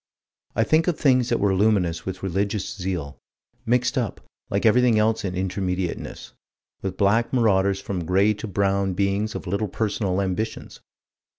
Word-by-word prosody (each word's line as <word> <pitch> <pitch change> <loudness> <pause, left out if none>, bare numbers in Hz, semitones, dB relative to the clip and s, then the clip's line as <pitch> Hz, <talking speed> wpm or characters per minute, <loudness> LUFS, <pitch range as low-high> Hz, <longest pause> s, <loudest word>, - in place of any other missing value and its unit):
I - - +3
think 160 +2 +2
of 175 - +1
things 130 -3 +3
that 120 - +1
were 100 -1 +2
luminous 95 -5 +1
with 95 0 -5
religious 100 +2 -2
zeal, 90 -7 -4 0.5
mixed 125 +3 +2
up, 115 -5 -3 0.3
like 100 +3 -1
everything 120 0 +5
else 110 +1 +2
in 95 -2 -3
Intermediateness, 95 -1 -3 0.5
with 95 -1 -4
black 110 +4 +2
marauders 100 -5 +2
and - - -22
from 90 -4 -3
gray 95 +5 +3
to 105 +2 -7
brown 100 -1 0
beings 100 +3 0
of - - -5
little 100 +4 -1
personal 100 -2 -1
ambitions. 100 +3 -3
100 Hz, 160 wpm, -24 LUFS, 95-110 Hz, 0.5 s, everything